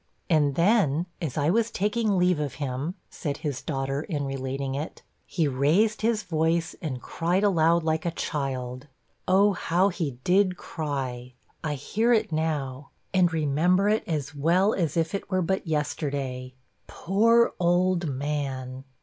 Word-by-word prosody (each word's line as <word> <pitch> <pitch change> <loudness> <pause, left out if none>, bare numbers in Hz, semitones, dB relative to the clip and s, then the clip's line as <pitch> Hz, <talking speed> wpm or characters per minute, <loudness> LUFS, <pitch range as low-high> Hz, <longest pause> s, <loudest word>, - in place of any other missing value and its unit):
'And 145 -4 +3
then, 170 -4 +3 0.2
as 155 -5 -3
I 150 +2 +2
was 230 +3 +2
taking 210 0 0
leave 180 -2 +3
of 145 -2 -3
him,' 140 +5 -3 0.2
said 145 -3 -4
his 145 -4 -4
daughter, 135 +1 -2
in 150 -4 -3
relating 135 0 -3
it, 145 +4 -5 0.2
'he 165 -5 0
raised 155 +12 +2
his 220 -1 +1
voice, 165 +1 0
and 140 -7 -3
cried 175 +4 0
aloud 170 -4 +3
like 160 0 0
a 170 - 0
child 135 -4 -4 0.4
Oh, 195 +2 +4
how 180 +2 +2
he 160 -9 -3
DID 185 0 +3
cry! 130 -7 -4 0.3
I 150 -2 -1
HEAR 220 - +1
it 220 -7 +1
now 145 -4 -2 0.2
and 180 -2 +4
remember 165 +6 +2
it 215 +1 +2
as 150 -4 -2
well 175 +8 +2
as 170 -3 -1
if 165 -1 0
it 200 - -4
were 185 -2 +1
but 190 +2 -1
yesterday 140 -4 -2 0.3
poor 230 +6 +3
old 175 -1 +2
man!!! 135 -2 -3
160 Hz, 150 wpm, -26 LUFS, 140-185 Hz, 0.4 s, Oh